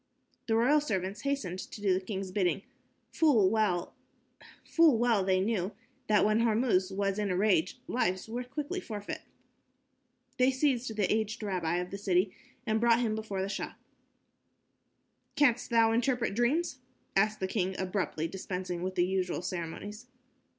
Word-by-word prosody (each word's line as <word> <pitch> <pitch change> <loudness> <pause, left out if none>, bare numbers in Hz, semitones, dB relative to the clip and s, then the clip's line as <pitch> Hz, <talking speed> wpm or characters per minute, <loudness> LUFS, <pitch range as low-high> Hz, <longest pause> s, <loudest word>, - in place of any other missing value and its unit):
The 225 - +2
royal 270 +7 +4
servants 195 -7 -2
hastened 245 -11 -2
to - - -8
do 200 -2 +2
the 185 - 0
king's 190 -1 -4
bidding. 185 -1 0 0.5
Full 235 - +4
well 210 -6 +1 0.8
they 230 - +4
knew 195 -1 -1 0.3
that 210 -1 +4
when 215 +1 +3
Hormuz 220 -4 +2
was 195 +1 -1
in 205 -1 0
a 180 - 0
rage, 190 +1 +2
lives 185 -6 0
were 240 +3 -4
quickly 290 +8 -4
forfeit. 210 - -6 1.2
They 255 +1 +5
seized 255 -4 0
the 205 -2 +1
aged 215 +1 -2
rabbi 180 -5 -1
of 180 +1 -3
the 200 - -5
city 185 -1 +1 0.3
and 220 -1 +1
brought 235 0 +4
him 225 -3 0
before 215 -3 -3
the - - -2
Shah. - - -4 1.6
"Canst 255 -6 +3
thou 230 -1 +4
interpret 240 -1 +1
dreams?" 265 +7 0 0.4
asked 215 +2 +2
the 190 - -1
king, 190 -1 -1
abruptly, 185 -4 -1
dispensing 180 -1 -4
with 185 +1 -3
the 175 - +3
usual 180 -2 -1
ceremonies. 185 +6 -5
210 Hz, 150 wpm, -30 LUFS, 185-235 Hz, 1.6 s, They